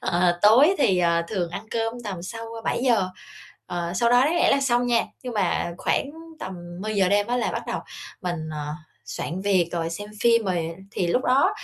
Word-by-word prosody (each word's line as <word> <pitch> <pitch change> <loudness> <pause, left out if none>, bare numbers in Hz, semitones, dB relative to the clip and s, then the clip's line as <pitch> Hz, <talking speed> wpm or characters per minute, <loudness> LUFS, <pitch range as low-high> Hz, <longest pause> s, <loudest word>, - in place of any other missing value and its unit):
Ờ, 175 0 +1
tối 260 - +7
thì, 190 -9 +3
ờ, 170 -1 +2
thường 180 -5 -2
ăn 175 - -5
cơm 225 0 -1
tầm 190 -5 -5
sau 225 +5 -6 0.2
7:00. 235 -7 +2 0.6
Ờ, 175 -1 -3
sau 235 +5 +2
đó 245 0 +6
đáng 320 +4 +1
lẽ - - +4
là 275 - +3
xong 245 -2 +2
nha, 235 -1 +3 0.2
nhưng 250 -3 -5
mà 180 -3 0
khoảng 280 - 0 0.3
tầm 190 - -5 0.3
10:00 205 -3 +1
đêm 205 +1 +2
á 245 - 0
là 245 - 0
bắt - - -3
đầu - - -2 0.4
mình, 175 -3 -3
ờ, 150 0 -4 0.3
soạn 175 +4 -4
việc 185 -4 +2
rồi 165 -1 -2
xem 205 +5 -6
phim 230 -2 +4
rồi 170 -3 -1 0.2
thì 180 - -1
lúc 250 +9 +1
đó, 270 +9 +4
200 Hz, 200 wpm, -24 LUFS, 175-240 Hz, 0.6 s, tối